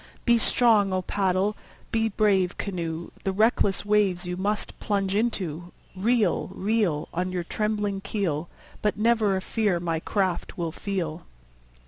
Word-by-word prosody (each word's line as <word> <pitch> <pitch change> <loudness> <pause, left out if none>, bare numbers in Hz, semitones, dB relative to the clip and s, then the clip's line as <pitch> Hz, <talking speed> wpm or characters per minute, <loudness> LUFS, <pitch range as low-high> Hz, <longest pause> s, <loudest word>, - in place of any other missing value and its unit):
Be 235 -1 +5
strong, 220 -4 +4
O 185 0 0
paddle! 195 +2 +1 0.4
be 225 -1 +1
brave, 195 -4 +2
canoe! 170 -4 -4
The 195 - 0
reckless 205 -1 +2
waves 205 -4 +2
you 180 0 -3
must 205 +3 -2
plunge 195 -2 0
into. 180 -6 -2 0.2
Reel, 210 -1 +1
reel. 200 -7 0
On 180 +2 -1
your 180 -1 -2
trembling 210 +1 -1
keel, 175 -6 -2 0.3
But 210 -1 0
never 220 -2 +3
a - - -3
fear 205 -4 0
my 165 -2 -1
craft 190 0 -1
will 170 -2 -2
feel. 175 -3 -4
195 Hz, 140 wpm, -26 LUFS, 180-210 Hz, 0.4 s, Be